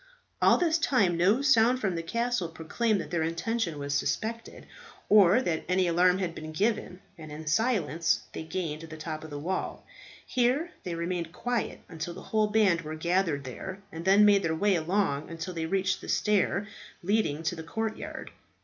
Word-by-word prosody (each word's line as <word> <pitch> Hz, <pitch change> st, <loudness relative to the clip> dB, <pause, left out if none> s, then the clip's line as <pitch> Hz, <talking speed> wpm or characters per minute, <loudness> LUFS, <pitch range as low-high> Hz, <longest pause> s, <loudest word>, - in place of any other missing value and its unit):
All -, -, +6 dB
this 330 Hz, -2 st, +2 dB
time 210 Hz, -, +2 dB
no 200 Hz, +10 st, +3 dB
sound 255 Hz, -2 st, +4 dB
from 195 Hz, -6 st, 0 dB
the 165 Hz, -, -2 dB
castle 235 Hz, +2 st, -1 dB
proclaimed 195 Hz, +7 st, -1 dB
that 150 Hz, -, -9 dB
their 170 Hz, -2 st, 0 dB
intention 170 Hz, +2 st, -1 dB
was 140 Hz, 0 st, -3 dB
suspected, 225 Hz, +10 st, -3 dB, 0.4 s
or 205 Hz, +3 st, +6 dB
that 160 Hz, -6 st, -1 dB
any 185 Hz, 0 st, +3 dB
alarm 180 Hz, +1 st, +3 dB
had 180 Hz, -3 st, -2 dB
been 155 Hz, -1 st, -8 dB
given, 195 Hz, 0 st, -1 dB, 0.2 s
and 155 Hz, -1 st, -9 dB
in 155 Hz, +2 st, -8 dB
silence 165 Hz, -, +1 dB
they -, -, -5 dB
gained 160 Hz, -2 st, -4 dB
the 160 Hz, -1 st, -9 dB
top 155 Hz, 0 st, -5 dB
of 160 Hz, -, -8 dB
the 145 Hz, -, -6 dB
wall. 180 Hz, +6 st, -3 dB, 0.4 s
Here 255 Hz, +8 st, +1 dB
they 175 Hz, -2 st, -4 dB
remained 170 Hz, 0 st, -3 dB
quiet 245 Hz, -1 st, -2 dB
until 165 Hz, +1 st, -6 dB
the -, -, -9 dB
whole 215 Hz, -1 st, +1 dB
band 205 Hz, -5 st, +3 dB
were 155 Hz, 0 st, -6 dB
gathered 170 Hz, -3 st, 0 dB
there, 190 Hz, +10 st, -7 dB
and 165 Hz, +1 st, -7 dB
then 195 Hz, +3 st, +6 dB
made 205 Hz, -1 st, +5 dB
their 165 Hz, -3 st, 0 dB
way 200 Hz, +4 st, +2 dB
along 165 Hz, -3 st, 0 dB
until 165 Hz, +2 st, -5 dB
they 165 Hz, -1 st, -3 dB
reached 190 Hz, +1 st, 0 dB
the -, -, -9 dB
stairs 205 Hz, -1 st, +1 dB, 0.4 s
leading 175 Hz, -6 st, 0 dB
to 165 Hz, +2 st, -1 dB
the 165 Hz, -, -7 dB
courtyard. 220 Hz, +7 st, -5 dB
180 Hz, 185 wpm, -28 LUFS, 160-215 Hz, 0.4 s, All